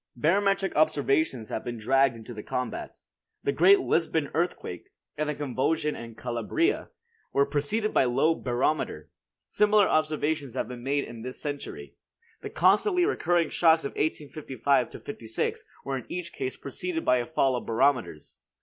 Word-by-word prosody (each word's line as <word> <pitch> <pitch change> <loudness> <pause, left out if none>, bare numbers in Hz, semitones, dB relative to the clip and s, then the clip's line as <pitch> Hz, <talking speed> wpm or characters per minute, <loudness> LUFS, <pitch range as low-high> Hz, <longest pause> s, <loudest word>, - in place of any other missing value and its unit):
Barometric 195 +8 +1
observations 145 -5 +1
have - - -3
been 120 -1 -5
dragged 135 +3 +3
into 115 +1 -9
the 105 - -7
combat. 125 +3 -5 0.4
The - - +1
great 190 +7 +6
Lisbon 160 -3 0
earthquake, 165 - -3 0.3
and 155 0 -2
the 150 - -2
convulsion 145 +3 -1
in 115 -1 -9
Calabria, 125 - -1 0.4
were 140 - +4
preceded 180 +11 -1
by - - +4
low 135 +6 +3
barometer. 130 +2 -1 0.4
Similar 210 -1 +4
observations 155 -3 0
have - - -1
been 125 -1 -8
made 140 +3 0
in 115 -1 -9
this 125 +2 -7
century. 140 - -6 0.4
The - - -6
constantly 280 - +3
recurring 175 - +1
shocks 160 -2 +4
of - - -3
1855 140 -4 -1
56 115 -5 -3 0.2
were 135 -1 -2
in 120 - -14
each 175 -1 -5
case 130 -1 -4
preceded 165 +4 -4
by 125 -1 +3
fall 135 -2 +1
of 120 - -5
barometers. 115 - 0
145 Hz, 150 wpm, -27 LUFS, 125-165 Hz, 0.4 s, great